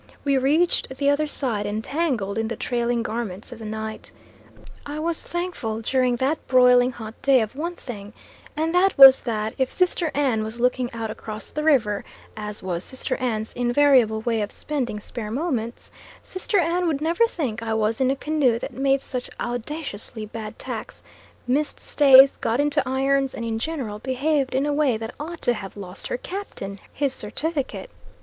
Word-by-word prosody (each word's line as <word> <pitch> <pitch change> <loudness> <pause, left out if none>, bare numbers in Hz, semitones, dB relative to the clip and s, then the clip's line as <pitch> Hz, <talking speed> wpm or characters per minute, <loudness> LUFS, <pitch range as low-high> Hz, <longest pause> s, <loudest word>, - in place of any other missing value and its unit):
We 280 -1 +2
reached 275 0 +1
the 280 0 +3
other 305 +2 +1
side 230 -8 -1
entangled 220 -1 -1
in 225 - 0
the 230 - -3
trailing 240 0 -1
garments 220 -2 -5
of 240 - -9
the 225 - -8
night. 220 0 -5 0.7
I 290 +1 -6
was 325 +1 -2
thankful 340 -11 -3
during 255 +1 +2
that 270 +6 -1
broiling 250 -1 +5
hot 220 -2 -9
day 270 -2 +5
of 220 +1 -2
one 340 +5 -3
thing, 205 -8 -8 0.5
and 320 +2 0
that 370 +2 +3
was 270 -1 +10
that 220 -2 -2
if 260 -1 +1
Sister 355 -2 +1
Ann 260 -7 +1
was 220 +2 -6
looking 250 0 +1
out 225 -2 -4
across 215 0 -7
the 300 - -3
river, 230 -10 +2 0.3
as 210 -1 -6
was 180 -2 -3
Sister 260 0 -3
Ann's 220 -3 -2
invariable 245 -3 +3
way 225 -1 0
of 205 - -3
spending 255 -8 -3
spare 215 +1 -6
moments, 240 -3 -3 0.3
Sister 395 +3 -1
Ann 350 0 +1
would 305 -4 0
never 340 +9 +3
think 260 - -3
I 225 -1 -1
was 220 +2 0
in 260 - +3
a 270 - +2
canoe 280 -4 +1
that - - -6
made 270 0 +1
such 250 -2 -4
audaciously 240 -3 -5
bad 215 0 -7
tacks, - - -7 0.4
missed 280 +4 0
stays, 275 -2 +7
got 230 +3 -1
into 290 0 +2
irons, 270 0 +1
and 230 - -4
in 225 -1 -2
general 245 -7 -4
behaved 265 +2 0
in 270 +2 +2
a 295 - 0
way 285 -6 +2
that 225 +1 -6
ought 330 +3 -7
to 245 - +3
have 195 -3 -8
lost 190 -1 -8
her - - -2
captain 250 - -6
his 280 -2 0
certificate. 295 - -3
255 Hz, 180 wpm, -24 LUFS, 220-290 Hz, 0.7 s, was